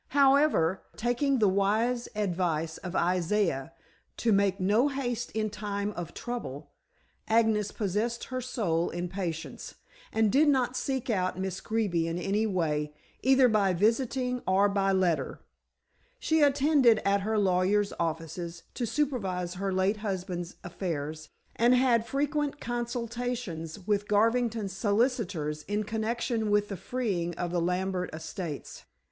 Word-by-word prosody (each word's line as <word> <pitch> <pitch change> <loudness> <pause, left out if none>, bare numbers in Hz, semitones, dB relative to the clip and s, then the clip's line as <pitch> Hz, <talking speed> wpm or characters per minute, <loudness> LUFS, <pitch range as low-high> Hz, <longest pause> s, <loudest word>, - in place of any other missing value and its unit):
However, 275 - +4 0.2
taking 245 +4 +1
the 215 -3 +4
wise 215 +6 +1
advice 175 -5 -1
of 185 0 -6
Isaiah 175 -4 +1 0.5
to 230 - +1
"Make 195 -1 +2
no 210 +8 +3
haste 245 -4 -2
in 215 -1 -1
time 205 -1 -3
of 175 -4 -7
trouble," 150 - -6 0.6
Agnes 220 -2 +3
possessed 215 +4 -1
her 255 -1 -4
soul 195 -10 0
in 175 +1 -4
patience, 170 -4 -5 0.4
and 220 -2 +2
did 295 +4 +4
not 260 -3 +2
seek 260 -1 -1
out 185 -3 0
Miss 190 -1 -3
Greeby 200 -7 0
in 165 +1 -2
any 200 +4 0
way, 150 -6 -1 0.3
either 265 0 +5
by 205 -4 +3
visiting 250 +5 +1
or 190 +2 +4
by 195 -1 +1
letter. 175 -8 0 0.8
She 320 -9 +1
attended 280 -5 +5
at 200 0 +3
her 215 +2 0
lawyers' 200 +1 +2
offices 165 +1 -3
to 240 - -2
supervise 195 -12 -1
her 195 +1 -2
late 190 +3 +1
husband's 185 -4 -4
affairs, 155 -4 -4 0.3
and 240 +2 +4
had 240 -3 +3
frequent 290 +2 -1
consultations 235 -7 -4
with 205 0 0
Garvington's 225 -1 +1
solicitors 200 - 0
in 205 +2 0
connection 220 +1 -1
with 205 0 +2
the 200 - -3
freeing 185 -6 -2
of 175 -1 -2
the 175 -1 0
Lambert 180 +1 -1
estates. 160 0 -6
205 Hz, 135 wpm, -29 LUFS, 180-240 Hz, 0.8 s, either